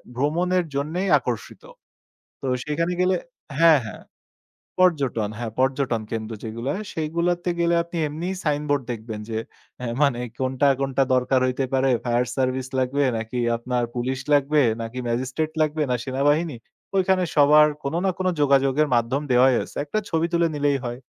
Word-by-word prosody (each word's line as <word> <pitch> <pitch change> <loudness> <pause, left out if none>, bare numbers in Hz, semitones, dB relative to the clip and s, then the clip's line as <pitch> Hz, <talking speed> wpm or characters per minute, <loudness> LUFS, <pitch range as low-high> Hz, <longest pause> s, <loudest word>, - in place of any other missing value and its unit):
ভ্রমণের 175 +6 +1
জন্যেই 165 +7 -1
আকর্ষিত। 120 -3 -5 0.8
তো - - -6 0.2
সেখানে 165 +4 -1
গেলে 185 0 +3 0.4
হ্যাঁ, 165 -3 +7
হ্যাঁ 110 - -8 0.8
পর্যটন 140 - +2
হ্যাঁ, 115 -2 -4
পর্যটন 130 -3 +1
কেন্দ্র 110 0 -4
যেগুলো 115 +3 -5
হয়, 215 +2 -5
সেইগুলাতে 170 +3 -1
গেলে 170 0 +2
আপনি 170 0 -7
এমনি 165 +5 -4
সাইনবোর্ড 145 -2 0
দেখবেন 110 -2 -6
যে 110 - -2 0.4
অ্যা 125 - -4 0.2
মানে 130 -4 +2 0.2
কোনটা, 130 +1 +1
কোনটা 135 0 +1
দরকার 130 +1 +2
হইতে 130 +1 0
পারে, 135 0 +2 0.2
ফায়ার 120 +1 +1
সার্ভিস 130 0 0
লাগবে 135 +3 +1
নাকি 110 +3 -4 0.2
আপনার 120 +1 -2
পুলিশ 130 +2 -2
লাগবে 145 +1 +3 0.2
নাকি 115 +3 -5
ম্যাজিস্ট্রেট 130 +6 -2
লাগবে 155 0 +1
না - - +2
সেনাবাহিনী। 145 +2 +1 0.4
ওইখানে 190 -1 +2
সবার 150 +1 +7 0.2
কোনো 140 +4 -2
না 190 - +3
কোনো 185 0 +1
যোগাযোগের 140 +1 +3
মাধ্যম 120 +5 +1
দেওয়াই 125 +1 +5
আছে। - - -11
একটা 180 +9 -1
ছবি 165 0 +1
তুলে 170 0 +3
নিলেই 145 -1 +1
হয়। 120 +1 -4
140 Hz, 155 wpm, -23 LUFS, 125-160 Hz, 0.8 s, হ্যাঁ